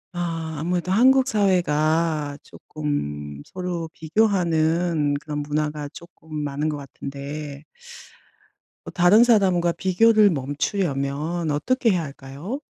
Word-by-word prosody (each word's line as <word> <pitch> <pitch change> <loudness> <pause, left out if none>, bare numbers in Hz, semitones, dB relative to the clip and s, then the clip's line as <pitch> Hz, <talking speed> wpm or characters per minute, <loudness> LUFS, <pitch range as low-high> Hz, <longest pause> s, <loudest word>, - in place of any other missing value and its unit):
아 165 -2 -3
아무래도 175 +3 -1
한국 260 +5 +5
사회가 160 - +1
쪼끔 75 - -5
서로 180 -3 -5
비교하는 165 -4 +1
그런 150 0 -5
문화가 150 0 -2
쪼끔 165 -2 -12
많은 145 +2 -2
것 150 - -3
같은데 140 +1 -7 1.2
어 - - -7
다른 180 +6 +6
사람과 190 -7 +3
비교를 210 +4 +4
멈추려면 150 +1 -2
어떻게 230 - +1
해야 180 -3 0
할까요? 140 - -7
160 Hz, 245 characters per minute, -23 LUFS, 145-180 Hz, 1.2 s, 다른